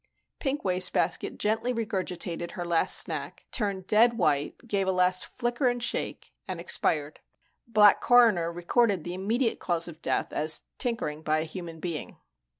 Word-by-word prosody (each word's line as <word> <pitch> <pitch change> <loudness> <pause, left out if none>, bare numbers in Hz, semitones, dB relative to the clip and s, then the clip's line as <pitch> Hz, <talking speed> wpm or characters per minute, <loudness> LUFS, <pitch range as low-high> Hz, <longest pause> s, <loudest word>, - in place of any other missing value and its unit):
Pink 280 0 -2
Wastebasket 185 -1 +1
gently 220 +4 0
regurgitated 180 -6 -4
her 175 - -5
last 170 -1 +2
snack, - - -2
turned 200 -5 -2
dead 230 +4 +4
white, 145 -7 +1
gave 200 -3 0
a - - +3
last 180 0 +1
flicker 240 +1 0
and 245 -1 -1
shake, 240 - -3
and - - -4
expired. 150 -1 0 0.5
Black 210 -3 +5
Coroner 225 -9 +4
recorded 185 +2 +1
the 175 - -5
immediate 225 +6 -1
cause 170 -2 +1
of 165 -1 -11
death - - -1
as 155 +1 0 0.2
tinkering 225 - -2
by 155 0 +1
a - - -1
human 165 0 -8
being. 165 -2 -5
185 Hz, 150 wpm, -27 LUFS, 170-230 Hz, 0.5 s, Black